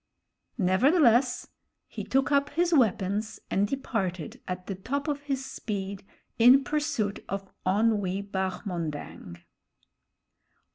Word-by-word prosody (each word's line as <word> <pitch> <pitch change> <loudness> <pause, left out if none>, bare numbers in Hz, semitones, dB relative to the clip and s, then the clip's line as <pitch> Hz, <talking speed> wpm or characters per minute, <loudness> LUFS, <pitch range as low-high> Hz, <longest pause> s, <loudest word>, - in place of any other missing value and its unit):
Nevertheless, 245 - +3 0.4
he - - -6
took 270 +2 +1
up 280 0 +3
his 345 +3 +1
weapons 215 - +1
and 200 +1 +2
departed 195 - -3
at 180 0 -4
the 195 - -4
top 270 - -3
of 290 -1 -1
his 275 -2 -3
speed 200 -5 -5 0.4
in 250 +4 +7
pursuit 260 -9 -1
of 195 -1 -5 0.2
Onwee 200 -1 +1
Bahmondang. 175 - -4
210 Hz, 105 wpm, -28 LUFS, 190-270 Hz, 0.4 s, in